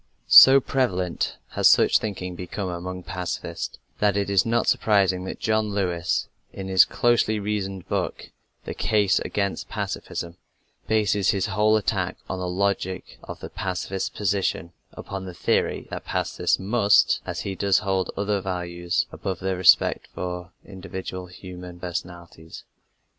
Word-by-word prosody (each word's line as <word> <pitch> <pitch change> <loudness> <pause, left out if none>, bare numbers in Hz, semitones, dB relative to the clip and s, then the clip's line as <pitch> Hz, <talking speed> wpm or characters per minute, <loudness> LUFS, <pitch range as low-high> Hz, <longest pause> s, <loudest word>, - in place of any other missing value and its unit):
So 135 +1 +10
prevalent 95 -11 -1
has - - +3
such - - +5
thinking 90 -4 -4
become 90 +2 -5
among 90 +1 -5
pacifists, 90 -2 -5 0.2
that 100 -1 +2
it 100 0 -1
is 100 +2 +3
not 115 0 +1
surprising 95 -4 +2
that - - -6
John 110 -1 +1
Lewis, 90 -4 -1 0.2
in 95 -1 -7
his 95 -2 +6
closely 115 -3 +1
reasoned 100 -2 -3
book, - - -3 0.3
The - - -4
Case 100 -3 +2
Against 100 -2 -3
Pacifism, 85 +1 -5 0.5
bases 105 -3 +2
his 95 -2 +1
whole 105 +1 +3
attack 95 -3 -1
on 95 - -4
the 90 - -3
logic 95 0 -2
of - - -9
the - - -7
pacifist 95 0 -3
position 95 -5 -1 0.2
upon 95 -1 -7
the 90 -2 -8
theory - - 0
that - - -6
pacifists - - 0
must, 100 +1 +3
as - - -3
he 100 - -4
does, 100 0 +2
hold 95 -2 -1
other 100 0 0
values 90 -2 -2
above 95 -1 -4
their 95 0 -1
respect 90 - +4
for 90 -1 -5
individual 95 -1 -7
human 90 -1 -10
personalities. 85 -2 -7
95 Hz, 140 wpm, -24 LUFS, 90-100 Hz, 0.5 s, So